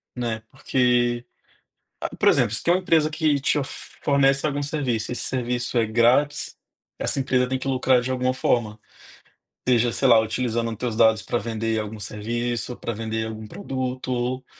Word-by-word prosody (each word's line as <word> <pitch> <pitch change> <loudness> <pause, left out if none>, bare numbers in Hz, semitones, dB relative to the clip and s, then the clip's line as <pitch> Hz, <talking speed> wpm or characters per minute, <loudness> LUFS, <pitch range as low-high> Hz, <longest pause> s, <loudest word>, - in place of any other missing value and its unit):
né, 115 -3 -3
porque 125 -2 +1 0.8
a, - - -4
por - - +3
exemplo, 105 - +3
se - - +1
tem 170 - +3
uma 185 - +1
empresa 160 -4 +2
que 155 -3 +1
te 145 - +2
of 135 - -2 0.3
fornece 140 0 +3
algum 145 -1 -1
serviço, 135 -7 -1
esse - - -3
serviço 125 -1 -1
é 115 - +3
grátis, 125 +7 +2 0.4
essa - - 0
empresa 130 -1 +1
tem 130 0 -1
que - - -7
lucrar 130 -1 +3
de 125 +2 -4
alguma 130 0 0
forma, 115 -4 0 0.9
seja, 120 -1 +3
sei 135 - +1
lá, 115 -3 +7
utilizando 115 +1 -1
teus 120 -1 -3
dados 110 -1 +4
pra 110 - -2
vender 115 -1 -2
algum 105 0 -5
serviço, 120 +4 -3
pra 115 - -4
vender 110 0 -3
algum 110 0 -7
produto, 130 - -4
ou, 125 +1 -2
125 Hz, 175 wpm, -24 LUFS, 115-130 Hz, 0.9 s, lá